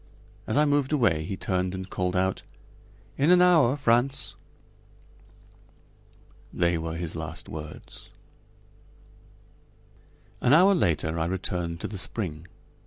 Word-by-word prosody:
As 110 - 0
I 150 - +5
moved 145 -1 +1
away 105 - +2
he 95 - -5
turned 90 -1 -1
and 95 0 -6
called 90 -1 -2
out: 95 +1 0 0.8
"In 145 +4 +3
an 180 0 +6
hour, 165 -8 +5
Frantz." 130 +1 +1 2.2
They 85 0 +1
were 80 0 -4
his 85 -1 -4
last 80 0 -6
words. 75 -1 -9 2.3
An 125 - +4
hour 185 +5 +6
later 80 - 0
I 80 - 0
returned 85 -2 -3
to - - -3
the 100 - -6
spring. 90 -6 -4
95 Hz, 120 wpm, -26 LUFS, 85-135 Hz, 2.3 s, an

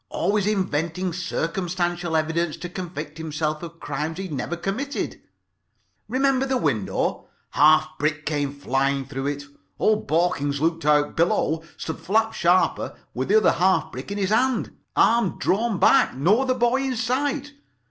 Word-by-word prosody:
Always 205 -1 0
inventing 180 -3 -1
circumstantial 175 0 -2
evidence 160 +1 -1
to 175 - -6
convict 165 -4 -6
himself 155 -1 -2
of 170 -1 -9
crimes 150 +3 -4
he 195 - -4
had 185 -5 -6
never 145 +5 -3
committed. 225 +11 -3 0.9
Remember 270 +1 +1
the 260 -1 +1
window? 130 - -1 0.2
Half 155 +1 +4
brick 150 0 -1
came 145 -2 -1
flying 135 -1 -1
through 135 0 -4
it. 145 0 -3 0.3
Old 215 0 +1
Borkins 145 -4 +1
looked 165 0 0
out. 150 -1 +3
Below 165 -1 +1 0.2
stood 160 - -5
Flap 220 +7 +1
Sharper 180 +1 +1 0.2
with 130 +2 -2
the 210 - +5
other 215 - +5
half 185 +2 +2
brick - - -7
in 200 - -3
his 195 -1 0
hand. 250 +1 +1 0.2
Arm 235 +1 +3
drawn 215 +2 +1
back. 265 - +4
No 180 - +3
other 260 -1 +1
boy 245 +2 +2
in 265 -1 -1
sight. 275 +5 -1
170 Hz, 155 wpm, -24 LUFS, 150-215 Hz, 0.9 s, the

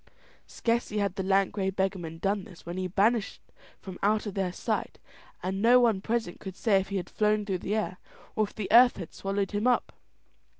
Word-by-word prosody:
Scarcely 230 -2 -1
had 200 -3 0
the 195 - -3
lank 195 0 +2
grey 195 -2 -1
beggarman 190 -4 -2
done 195 +3 -1
this 180 -5 -14
when 170 +1 -5
he 185 0 -2
vanished 205 +4 +1 0.4
from 190 -2 -9
out 210 +2 +2
their 195 -3 -2
sight, - - -3 0.5
and 190 +1 -2
no 245 +3 +6
one 225 -6 +3
present 225 -4 -2
could 190 -2 -8
say 200 -1 +3
if 190 - -5
he 200 - -2
had 180 - -4
flown 210 0 +1
through 190 -3 -2
the 205 +4 -2
air 210 -4 -2 0.4
or 215 - +2
if 205 - -14
the 210 - -3
earth 245 +2 +7
had 175 -4 -8
swallowed 195 0 -2
him 210 +3 0
up. 250 - +1
200 Hz, 205 wpm, -28 LUFS, 190-215 Hz, 0.5 s, earth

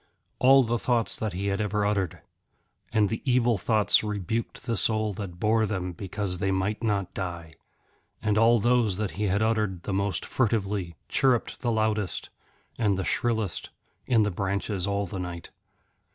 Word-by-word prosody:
All 135 +1 +7
the 120 0 -1
thoughts 120 -2 +1
that 110 -4 -3
he 95 +3 -3
had 100 +1 0
ever 105 0 0
uttered! 100 -3 -1 0.7
And 110 -2 +3
the 110 +2 -3
evil 120 -5 +2
thoughts 105 0 +4
rebuked 105 +2 -3
the 115 - 0
soul 110 +1 +1
that 90 -3 -7
bore 110 +1 +2
them 95 -3 -3
because 95 +1 -3
they 95 0 0
might 95 +3 -1
not 100 -4 -1
die. 85 -4 -5 0.7
And 105 -1 0
all 115 +2 +5
those 120 -4 +2
that 105 -2 -2
he 105 - -2
had 100 +2 +1
uttered 105 -5 0
the 100 - -3
most 100 0 -1
furtively, 100 -7 -1
chirrupped 130 -4 +1
the 120 - 0
loudest 110 -3 -1 0.5
and 105 -4 +2
the 95 - -1
shrillest 110 -4 -1 0.4
in 115 -4 +4
the 105 - 0
branches 100 +1 -2
all 100 0 0
the 95 +1 -6
night. 90 -1 -6
105 Hz, 165 wpm, -27 LUFS, 95-110 Hz, 0.7 s, All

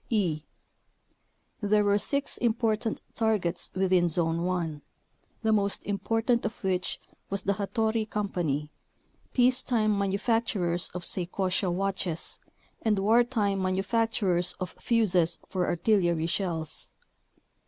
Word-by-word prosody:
e. 180 - +1 1.2
There 210 0 +3
were 205 0 +3
six 280 +5 0
important 225 -2 0
targets 205 -6 0
within 185 -2 +3
Zone 165 0 0
1, 170 -5 -2 0.6
the 220 - +3
most 200 -2 +1
important 225 +4 0
of 215 0 -5
which 185 -1 -1 0.3
was 195 0 -2
the 200 - +2
Hattori 220 +2 -1
Co., 210 0 -1 1.0
peacetime 245 -4 +3
manufacturers 200 -3 +1
of 175 -1 -4
Sei 180 -2 0
kosha 185 0 0
watches, 185 -2 -2 0.4
and 220 -3 +2
wartime 215 -1 +2
manufacturers 190 -1 +1
of 185 - -4
fuzes 185 -8 +2
for 180 -2 -1
artillery 175 -3 +2
shells. 170 -3 -2
200 Hz, 110 wpm, -28 LUFS, 180-220 Hz, 1.2 s, There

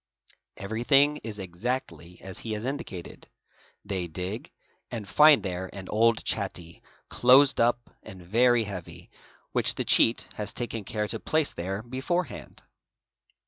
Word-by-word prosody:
Everything 135 +8 +2
is 110 -5 -7
exactly 90 - -5
as 95 -1 -6
he 110 - -4
has 105 +2 -4
indicated: 115 -10 -6 0.6
they 95 -3 -3
dig 95 - -6 0.4
and 110 -5 -6
find 150 +5 +6
there 95 -1 -4
an 95 -2 -7
old 115 +1 +2
chatty, 90 -5 -4 0.3
closed 130 +3 +5
up 120 0 +1
and 95 -4 -11
very 120 +5 +3
heavy, 95 -5 -9 0.4
which - - +2
the - - -3
cheat 115 - +4
has 105 - -4
taken 115 -4 -4
care 105 +1 -2
to 115 - -1
place 155 -2 +1
there 95 +4 -4
beforehand. 135 +8 -4
110 Hz, 135 wpm, -27 LUFS, 95-125 Hz, 0.6 s, find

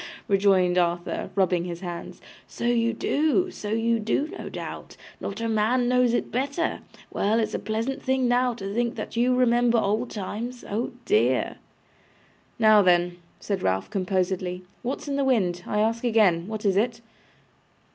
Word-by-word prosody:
rejoined 190 -3 +3
Arthur, 175 0 -1
rubbing 185 -3 +2
his 175 0 -6
hands. 175 -2 -7 0.3
'So - - -8
you 230 -1 +2
do, 310 +10 +1
so 210 - -7
you 230 +1 +1
do, 250 +8 0
no - - -6
doubt. - - -8 0.2
Not 200 +2 -5
a 230 - -1
man 225 +3 +2
knows 250 -1 +3
it - - -2
better. 280 +6 -1 0.3
Well, 215 +3 +1
it's 220 - -1
a - - -1
pleasant 225 +5 -3
thing 260 -1 +1
now 245 0 +2
to 195 -2 -5
think 235 +1 0
that - - -6
you 245 +2 +3
remember 240 -1 +3
old 220 +3 0
times. 230 +4 -5
Oh 220 +4 -2
dear!' 125 +4 +2 1.0
'Now 215 -2 +6
then,' 175 -1 +3 0.2
said 200 -3 -3
Ralph, 95 - -1
composedly; 185 -2 -1 0.2
'what's 260 +4 -4
in 280 -1 -1
the 280 - +1
wind, 190 -10 +1
I 210 - 0
ask 230 +2 0
again? 205 -8 +3
What 215 -1 -5
is 195 -1 +3
it? 230 +2 0
220 Hz, 165 wpm, -25 LUFS, 185-240 Hz, 1.0 s, Now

